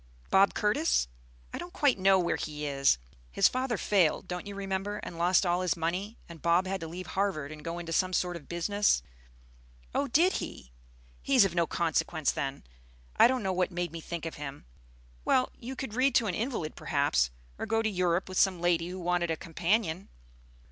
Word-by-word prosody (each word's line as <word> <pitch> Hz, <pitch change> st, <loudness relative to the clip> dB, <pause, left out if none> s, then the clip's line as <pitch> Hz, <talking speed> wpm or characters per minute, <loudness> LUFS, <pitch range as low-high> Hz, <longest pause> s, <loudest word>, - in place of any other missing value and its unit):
"Bob 195 Hz, +1 st, +5 dB
Curtis? 215 Hz, -, +2 dB, 0.5 s
I -, -, -4 dB
don't 350 Hz, 0 st, -8 dB
quite 280 Hz, -8 st, +2 dB
know 190 Hz, 0 st, +5 dB
where 175 Hz, -2 st, +1 dB
he 150 Hz, -1 st, -5 dB
is. 140 Hz, -, +3 dB, 0.3 s
His -, -, +5 dB
father 255 Hz, -3 st, -1 dB
failed, 185 Hz, -3 st, +2 dB
don't 180 Hz, +2 st, -5 dB
you 200 Hz, -, -6 dB
remember, 195 Hz, +1 st, -3 dB
and -, -, -7 dB
lost 180 Hz, +2 st, +3 dB
all 175 Hz, +1 st, +1 dB
his 180 Hz, -1 st, 0 dB
money, 180 Hz, +7 st, -2 dB
and 165 Hz, -3 st, -11 dB
Bob 170 Hz, +2 st, +3 dB
had 190 Hz, 0 st, -3 dB
to 165 Hz, -, -4 dB
leave 180 Hz, +3 st, -7 dB
Harvard 160 Hz, -4 st, -1 dB
and 155 Hz, -1 st, -10 dB
go 165 Hz, +2 st, -4 dB
into 170 Hz, -1 st, -5 dB
some 185 Hz, +3 st, +2 dB
sort 180 Hz, -1 st, 0 dB
of 160 Hz, -4 st, -10 dB
business?" 185 Hz, -, +1 dB, 0.9 s
"Oh, 280 Hz, -, +1 dB
did 335 Hz, +9 st, +3 dB
he? 65 Hz, -1 st, -7 dB, 0.5 s
He's 260 Hz, -6 st, +5 dB
of 190 Hz, -, -1 dB
no 170 Hz, -1 st, +1 dB
consequence, 160 Hz, -1 st, 0 dB
then. 140 Hz, 0 st, -4 dB, 0.5 s
I -, -, +8 dB
don't 255 Hz, -2 st, -1 dB
know 190 Hz, -1 st, 0 dB
what 180 Hz, 0 st, +1 dB
made 175 Hz, -2 st, -3 dB
me 165 Hz, 0 st, -7 dB
think 170 Hz, 0 st, -5 dB
of 165 Hz, -, -5 dB
him. 145 Hz, -1 st, -7 dB, 0.6 s
Well, 255 Hz, -, +2 dB
you 255 Hz, +3 st, -7 dB
could 265 Hz, -5 st, -5 dB
read 255 Hz, +2 st, +2 dB
to 230 Hz, -, +4 dB
an 195 Hz, -, -1 dB
invalid, 220 Hz, -, -3 dB
perhaps, -, -, +1 dB, 0.3 s
or -, -, -3 dB
go 225 Hz, +1 st, +1 dB
to -, -, +2 dB
Europe 180 Hz, -3 st, 0 dB
with 185 Hz, -1 st, -2 dB
some 190 Hz, -3 st, +3 dB
lady 170 Hz, -1 st, +1 dB
who 185 Hz, +1 st, -6 dB
wanted 175 Hz, -1 st, 0 dB
a 160 Hz, -, -1 dB
companion." 175 Hz, +2 st, -1 dB
180 Hz, 200 wpm, -29 LUFS, 165-205 Hz, 0.9 s, I